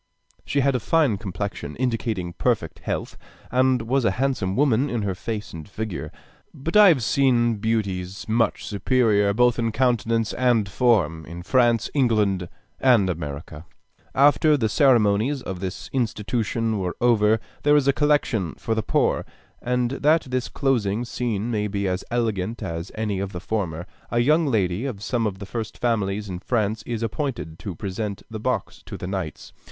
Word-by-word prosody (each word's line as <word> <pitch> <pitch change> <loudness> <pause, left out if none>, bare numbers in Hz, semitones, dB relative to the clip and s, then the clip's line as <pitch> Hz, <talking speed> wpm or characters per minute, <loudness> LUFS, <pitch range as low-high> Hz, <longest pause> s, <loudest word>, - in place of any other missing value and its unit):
She 140 - 0
had 140 +1 +2
a 125 - 0
fine 135 -5 +2
complexion, 95 -6 -5
indicating 115 -8 -2
perfect - - -1
health, - - -4 0.3
and 130 -1 +3
was 130 +3 +1
a 115 - +3
handsome 125 -8 0
woman 135 0 +2
in 120 -3 -2
her 100 -2 -1
face 105 +3 -5
and 80 +3 -9
figure. 95 -9 -5 0.4
But 165 +7 -5
I 210 -1 +9
have 150 -10 +4
seen 120 -3 +2
beauties 100 -4 -2
much 115 +1 +1
superior, 105 -1 +2
both 120 +3 +3
in 115 -1 0
countenance 115 -2 +1
and 120 -5 +2
form, 95 -7 +2
in 85 +2 -8
France, 120 +1 +3
England, 105 - +1 0.3
and 115 -8 +4
America. 75 0 -7 0.5
After 145 +2 +5
the 110 -5 0
ceremonies 120 +1 +3
of 95 -2 -5
this 95 0 -5
institution 115 -1 -1
are 90 - -3
over, 110 -2 +3 0.2
there 145 0 +4
is 145 -2 +3
a 140 - +5
collection 145 - +1
for 115 - -2
the 110 - 0
poor; - - +1 0.4
and 125 0 0
that 150 +4 +3
this 125 -1 -1
closing 120 -5 0
scene 120 -2 -2
may 105 -2 0
be 100 -1 -2
as 90 0 -2
elegant 115 -3 -1
as 85 +2 -5
any 105 -3 -2
of 100 0 -4
the 90 - -4
former, 90 -4 -3 0.2
a 120 - -1
young 150 +6 +3
lady 105 -2 0
of 105 -6 -6
some 115 -2 0
of 95 -2 -4
the 100 - -7
first 110 +1 -5
families 105 -3 -1
in 90 -2 -5
France 110 +1 -1
is 115 -1 -3
appointed 115 - -3
to 100 -5 -6
present 100 +2 -4
the 110 - -5
box - - -2
to - - -6
the - - -6
knights. 95 -5 -5
110 Hz, 170 wpm, -24 LUFS, 100-125 Hz, 0.5 s, I